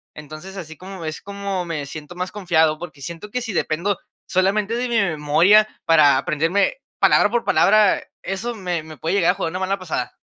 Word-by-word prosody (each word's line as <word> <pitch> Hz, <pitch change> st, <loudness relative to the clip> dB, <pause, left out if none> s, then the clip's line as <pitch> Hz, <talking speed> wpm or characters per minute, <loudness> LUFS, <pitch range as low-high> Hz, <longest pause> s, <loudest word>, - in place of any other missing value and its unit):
Entonces, 155 Hz, +6 st, -10 dB
así 160 Hz, -4 st, -8 dB
como 185 Hz, -2 st, -9 dB
es 155 Hz, 0 st, -5 dB
como 200 Hz, -2 st, -4 dB
me 155 Hz, -4 st, -4 dB
siento 155 Hz, +4 st, -9 dB
más 180 Hz, +1 st, -4 dB
confiado, 160 Hz, -6 st, +1 dB
porque 155 Hz, -5 st, -9 dB
siento, 170 Hz, +6 st, -7 dB
que 250 Hz, -, -1 dB
si 225 Hz, -3 st, -4 dB
dependo 175 Hz, +4 st, 0 dB, 0.3 s
solamente 200 Hz, +4 st, +1 dB
de 245 Hz, +1 st, -2 dB
mi 235 Hz, -, +1 dB
memoria, 175 Hz, +3 st, +4 dB, 0.2 s
para 155 Hz, -4 st, +5 dB
aprenderme 165 Hz, -, +1 dB, 0.2 s
palabra -, -, +5 dB
por 240 Hz, +2 st, -1 dB
palabra, 210 Hz, 0 st, +4 dB, 0.2 s
eso 225 Hz, +6 st, -3 dB
me 180 Hz, -5 st, -3 dB
me 155 Hz, -1 st, -11 dB
puede 165 Hz, +5 st, -2 dB
llegar 180 Hz, -3 st, +3 dB
a -, -, -2 dB
jugar 165 Hz, -, -3 dB
una 185 Hz, -, -4 dB
mala 190 Hz, +1 st, -1 dB
pasada. 160 Hz, -9 st, -4 dB
180 Hz, 195 wpm, -21 LUFS, 160-200 Hz, 0.3 s, para